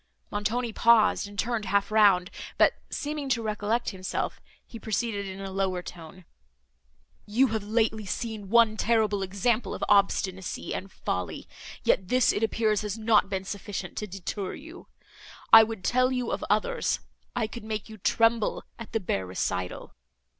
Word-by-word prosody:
Montoni 220 +3 -1
paused, 225 -3 +4
and 205 0 -12
turned 225 -1 -1
half 200 +1 +1
round, 200 -4 +4 0.3
but, - - +5 0.2
seeming 295 -1 -4
to 235 -3 +1
recollect 215 +2 -1
himself, 185 -2 -4 0.2
he 230 - -10
proceeded 215 -2 -2
in 190 0 -7
a 195 -1 -6
lower 190 -2 -1
tone. 175 +1 -11 1.0
"You 245 +5 +3
have 220 -1 -2
lately 220 -1 0
seen 215 -2 -4
one 225 -1 +5
terrible 215 -3 +2
example 200 +4 0
of - - -6
obstinacy 190 -2 +1
and 195 0 -5
folly; 90 - -4 0.4
yet 190 - +2
this, 255 +4 +3
it - - -2
appears, 220 -1 +1
has 210 0 -4
not 215 -2 +3
been 190 -1 -2
sufficient 195 -1 -6
to 210 - -3
deter 195 +1 -5
you.—I 295 -7 +1
could 220 -4 -5
tell 255 +1 +2
you 250 -2 -1
of - - -3
others—I - - -1
could 220 +1 -8
make 215 -2 -4
you 220 -1 -11
tremble 225 +2 +2 0.2
at 230 - -9
the 225 - +1
bare 95 - -2
recital." 90 0 -3
215 Hz, 155 wpm, -27 LUFS, 195-230 Hz, 1.0 s, but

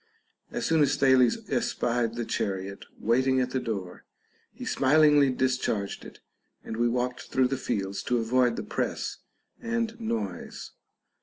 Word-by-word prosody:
As - - -3
soon 160 -1 +3
as 140 -1 +3
Thales 135 - +3
espied 120 -3 0
the 120 -1 -3
chariot 100 -1 -3
waiting 130 +3 +2
at 125 0 0
the 130 - 0
door, 100 -7 -5 0.5
he - - -9
smilingly 145 0 +4
discharged 130 -6 -1
it, - - -12 0.4
and 110 - -6
Ave 120 +1 +2
walked 125 +1 -2
through 130 -1 +2
the 135 - 0
fields 100 -7 -2
to 125 - +1
avoid 120 +1 +2
the - - -4
press - - -3 0.4
and 230 0 -2
noise. 105 - -4
125 Hz, 145 wpm, -27 LUFS, 115-135 Hz, 0.5 s, smilingly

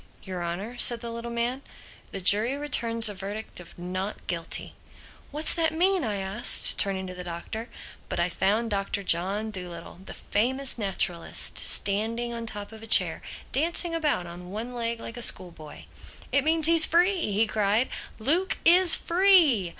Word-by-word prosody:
"Your 185 -2 -6
Honor," 195 +8 -6
said 240 0 +5
the 235 - -7
little 235 +1 -7
man, 235 +3 -3 0.5
"the 195 - -5
jury 210 +7 +3
returns 230 -6 +2
a 205 - -2
verdict 200 +2 -8
of 175 - -14
Not 185 +3 -6
Guilty." 170 -1 -3 0.6
"What's 300 +2 0
that 325 -1 -1
mean?" 370 +1 +1
I 215 -4 -3
asked, 195 +3 +4
turning 190 -1 0
to 185 - -8
the 180 0 -9
Doctor. 180 +7 -7 0.4
But - - -4
I 170 - +1
found 210 +5 -1
Doctor 200 0 -3
John 195 +5 0
Dolittle, 175 -3 -9
the - - -10
famous 260 +5 -2
naturalist, 180 -4 0
standing 230 +4 -1
on 230 -1 -6
top 205 -1 -5
of 220 0 -12
a 225 - -10
chair, - - +3 0.3
dancing 335 +4 0
about 300 - -1
on 175 +1 -10
one 225 +5 -7
leg 235 -1 -4
like 230 +1 -9
a - - -5
schoolboy. 165 -8 -2 0.5
"It 280 - +2
means 320 0 +1
he's 330 0 +7
free!" 350 - +1
he 210 +3 +2
cried, 215 +2 0 0.3
"Luke 325 +12 0
is 350 0 +8
free!" 335 - +3
220 Hz, 165 wpm, -25 LUFS, 190-270 Hz, 0.6 s, is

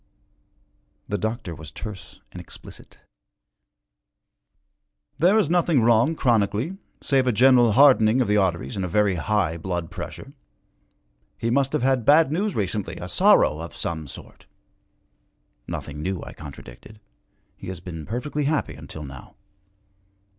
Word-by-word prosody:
The 105 - -2
doctor 110 -5 -3
was 80 -2 -10
terse 95 -2 -9
and - - -8
explicit. - - -12 2.2
'There 180 +7 +4
is 215 - +3
nothing 170 -6 +2
wrong, 120 +7 +3
chronically, 115 - 0 0.2
save 135 -3 +1
a - - +4
general 120 -1 +5
hardening 125 -3 +5
of 125 - +2
the 105 - +2
arteries 95 +1 0
and 95 - -2
a - - -1
very 100 +2 +2
high 90 0 0
blood 85 -1 -4
pressure. 135 - -8 1.0
He 115 - -2
must 135 +1 +2
have - - 0
had 130 -2 +2
bad 150 +4 +5
news 195 +5 -1
recently, 105 0 -2
a - - -7
sorrow 75 - +4
of 85 +1 -8
some 80 -3 -4
sort.' 65 - -13 1.2
'Nothing 75 0 -6
new,' 95 +2 -3
I - - -9
contradicted. 75 - -12 0.6
'He - - -11
has 95 -2 -5
been 85 -3 -8
perfectly 145 +5 -3
happy 145 - 0
until 75 +2 -9
now.' 65 -2 -11
110 Hz, 140 wpm, -24 LUFS, 85-135 Hz, 2.2 s, general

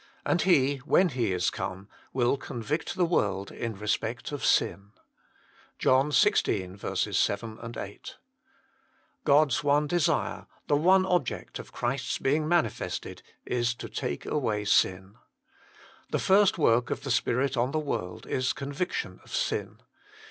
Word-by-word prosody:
And 170 - +2
He, 145 -6 +3
when 160 +7 +3
He 125 -7 -1
is 90 -1 +1
come, 95 +1 -5 0.2
will 125 0 +2
convict 140 +3 -4
the 180 - +2
world 100 - 0
in 115 -3 -4
respect 110 +4 -2
of 145 - -5
sin." 100 +1 +1 0.8
JOHN 130 +3 +3
xvi. 95 -6 +1
7, 110 +4 -1
8. 180 - -8 1.1
God 150 0 +4
s 120 - 0
one 145 +1 +3
desire, 170 +1 0 0.2
the 145 - +2
one 185 +5 +4
object 175 -8 -1
of - - -10
Christ 125 +2 -2
s - - -1
being 150 +3 +1
manifested, 170 0 -1 0.2
is 120 -1 0
to - - -7
take 70 - -4
away 110 -8 -1
sin. 95 0 +1 0.9
The - - 0
first 195 0 +4
work 120 -6 +3
of - - -3
the 135 - -2
Spirit 135 +1 +1
on 120 +1 +1
the 155 - -2
world 115 -12 -3
is 130 -1 0
conviction 140 +6 -4
of - - -7
sin. - - -2
130 Hz, 140 wpm, -28 LUFS, 105-150 Hz, 1.1 s, God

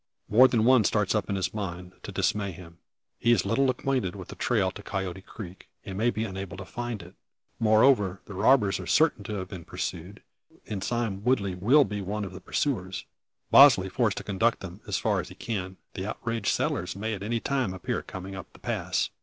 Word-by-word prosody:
More 125 +5 +7
than 115 -3 +2
one 130 -2 +6
starts 105 -1 +2
up 105 -3 -1
in 100 - 0
his 95 -2 -1
mind 90 -3 -5
to - - -7
dismay 100 -2 0
him. 85 0 -13 0.4
He 120 - +3
is 120 - +3
little 130 +6 +2
acquainted 125 -7 -1
with 95 -3 -9
the - - -8
trail - - +1
to - - -10
Coyote 95 -1 -4
Creek, 95 -2 -10 0.2
and 95 - -6
may 110 +5 +2
be 110 -2 -2
unable 95 -1 -6
to 95 - -7
find 120 -1 -5
it. 90 - -14 0.5
Moreover, 110 -3 +4
the 105 - -9
robbers 105 +1 +3
are - - -7
certain 155 -9 +3
of 95 -2 -5
being 90 -3 -7
pursued, 90 +5 -5 0.4
and 100 -3 -4
Sime 115 -4 -2
Woodley 105 -6 +1
will 120 +12 +5
be 105 -3 -4
one 100 +2 -3
of 95 - -8
the 95 - -9
pursuers; 95 -6 -2 0.5
Bosley - - +8
forced - - +1
to - - -4
conduct 110 +4 +1
them, 95 0 -8
far - - 0
as - - -5
he - - -11
can. 95 -4 -4 0.2
The 95 +1 -4
outraged 115 -1 -3
settlers - - -1
may 110 +3 -2
at 100 - -5
any 115 +3 -1
moment 130 -9 0
appear 95 - -2
coming 95 +1 -8
up 95 -3 -8
the - - -15
pass! - - -1
100 Hz, 205 wpm, -27 LUFS, 95-115 Hz, 0.5 s, Bosley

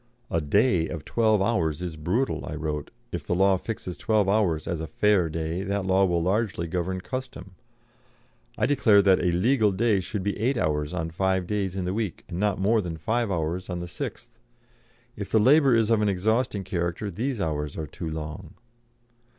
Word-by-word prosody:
"A 85 - +1
'day' 90 - +2
of 80 -3 -6
twelve 110 -4 +2
hours 80 -9 0
is 90 -3 -5
brutal," 90 - -1
I 75 - -5
wrote; 75 -2 -3 0.2
"if 85 -4 -5
the 90 - +1
law 95 +1 +4
fixes 90 -3 -6
twelve 110 -3 +2
hours 95 -7 +1
as 85 -2 -2
a 80 - -4
'fair 100 -2 +2
day' 80 +3 -3
that 100 0 -2
law 95 +1 +4
will 85 -2 +1
largely 95 -1 0
govern 90 +2 -2
custom. 130 -6 -6 1.1
I - - +2
declare 110 -8 +4
that 95 -2 +5
a 90 - +2
'legal 110 +4 +3
day' 105 +1 +2
should 95 +1 -4
be 100 +1 -2
eight 125 +4 +1
hours 75 -5 0
on 80 -2 -3
five 95 +1 0
days 95 -1 -2
in 95 -2 -2
the 90 - -1
week 105 -4 -3
and 85 - -5
not 105 -1 +1
more 110 +3 +3
than 85 -4 -5
five 115 +8 -1
hours 85 +1 -2
on 90 - -3
the 85 0 -5
sixth. 115 +8 -7 0.8
If 100 -1 -6
the 110 - +3
labour 135 +2 +5
is 115 -1 +2
of 110 -2 +3
an 105 - +2
exhausting 105 +2 0
character 90 +2 -2
these 120 +6 -2
hours 75 -4 -2
are 80 - -3
too 80 +3 -6
long." 80 +2 -6
95 Hz, 195 wpm, -26 LUFS, 85-110 Hz, 1.1 s, that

